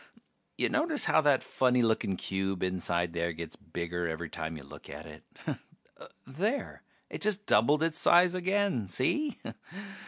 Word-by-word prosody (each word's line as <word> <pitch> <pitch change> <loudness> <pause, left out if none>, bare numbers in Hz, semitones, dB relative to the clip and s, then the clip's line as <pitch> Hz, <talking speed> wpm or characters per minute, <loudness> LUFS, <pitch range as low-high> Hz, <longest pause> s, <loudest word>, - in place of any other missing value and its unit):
Ya - - +2
notice 310 -1 +1
how - - +4
that 145 -3 +3
funny 125 -1 +2
looking 110 -4 +1
cube 95 -1 -2
inside 85 -2 0
there 85 0 -1
gets 80 0 -7
bigger 85 +1 -4
every 80 0 -4
time 80 0 -4
you 70 - -10
look 70 - -13
at - - -8
it? - - -12 1.0
There... 200 - -2 0.3
it - - -6
just 205 0 +1
doubled 145 +9 +4
its 165 -1 +1
size 175 +1 +6
again, 185 - 0
see? 270 - 0
115 Hz, 150 wpm, -30 LUFS, -, 1.0 s, size